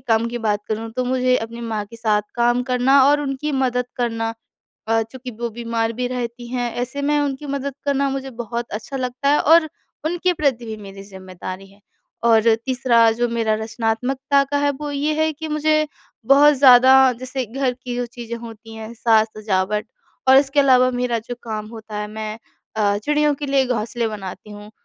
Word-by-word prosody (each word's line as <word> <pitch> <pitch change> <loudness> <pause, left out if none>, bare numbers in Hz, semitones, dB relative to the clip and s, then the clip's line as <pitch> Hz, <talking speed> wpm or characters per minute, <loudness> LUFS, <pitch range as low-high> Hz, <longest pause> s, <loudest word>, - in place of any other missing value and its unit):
काम 230 -2 +1
की 240 - -4
बात 210 -2 0
करूँ, 225 +1 -3
तो 255 +1 -2
मुझे 255 0 +2
अपनी 230 +1 -6
माँ 220 -3 -3
के 230 +2 -13
साथ 215 -2 +1
काम 240 +1 +2
करना 265 +2 +5
और 290 0 +3
उनकी 285 +1 -3
मदद 250 -2 0
करना 225 -2 -2 0.5
अ, 225 0 +2
चूँकि 250 +3 -8
वो 235 0 -2
बीमार 230 0 -2
भी 250 +2 -2
रहती 240 -1 -5
हैं। 245 -1 -2
ऐसे 260 +3 -4
में 295 +1 +1
उनकी 285 0 -2
मदद 280 0 -3
करना 280 0 +1
मुझे 270 0 -4
बहुत 235 0 -5
अच्छा 220 +6 -5
लगता 255 +2 -1
है 295 - +4
और 320 0 +5 0.4
उनके 350 +2 +1
प्रति 270 -7 0
भी 220 -1 -6
मेरी 195 0 -10
ज़िम्मेदारी 190 0 -9
है। 200 - -22 0.4
और 225 -1 +5 0.2
तीसरा 245 -3 +3
जो 240 +2 0
मेरा 225 -2 0
रचनात्मकता 245 +5 0
का 285 +1 -2
है, 285 0 +2
वो 290 +1 -6
ये 290 +2 0
है 315 0 +2
कि 315 +2 -7
मुझे 305 0 +1 0.4
बहुत 290 +2 +7
ज़्यादा 260 -1 +7 0.3
जैसे 255 0 -4
घर 255 +3 -1
की 250 -1 -7
जो 245 0 -1
चीज़ें 235 -1 -7
होती 225 -1 -11
हैं, 220 +1 -8
साज-सजावट 215 -2 +1 0.4
और 265 0 +8
इसके 280 +1 +3
अलावा 255 -2 +5
मेरा 245 -1 -1
जो 245 - -3
काम 215 -2 -5
होता 220 -2 -8
है, 210 - -3
मैं 215 0 -6 0.4
अ, 205 -1 +2
चिड़ियों 295 +6 +1
के 290 - -5
लिए 275 -1 +2
घोंसले 235 -1 -2
बनाती 210 -1 -7
हूँ, 210 +1 -11
245 Hz, 190 wpm, -21 LUFS, 225-270 Hz, 0.5 s, और